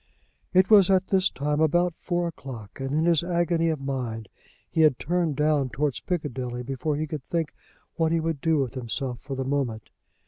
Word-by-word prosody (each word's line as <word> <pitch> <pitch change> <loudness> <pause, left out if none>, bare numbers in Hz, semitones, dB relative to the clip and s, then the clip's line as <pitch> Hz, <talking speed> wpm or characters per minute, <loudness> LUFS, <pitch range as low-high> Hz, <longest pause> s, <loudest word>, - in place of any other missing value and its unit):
It 185 +2 +4
was 200 -4 +7
at 190 -1 +4
this 190 -1 +2
time 150 +2 -1
about 175 +3 +3
four 175 -1 -1
o'clock, 130 -10 -9
and 135 0 -3
in 155 +3 +1
his 170 -1 +3
agony 170 -1 +1
of 155 -3 -1
mind 125 -6 -4 0.4
he 160 - 0
had 155 -5 +5
turned 170 -2 0
down 150 -2 +2
towards 140 +4 -1
Piccadilly 130 -8 -3
before 135 +4 -2
he 155 +2 -1
could 150 -1 -5
think 165 0 -2 0.4
what 160 -1 +2
he 165 - +2
would 160 -3 -2
do 160 -1 +2
with 135 -4 -1
himself 125 0 -3
for 135 0 -5
the 130 0 -3
moment. 130 -6 -2
150 Hz, 195 wpm, -26 LUFS, 135-170 Hz, 0.4 s, was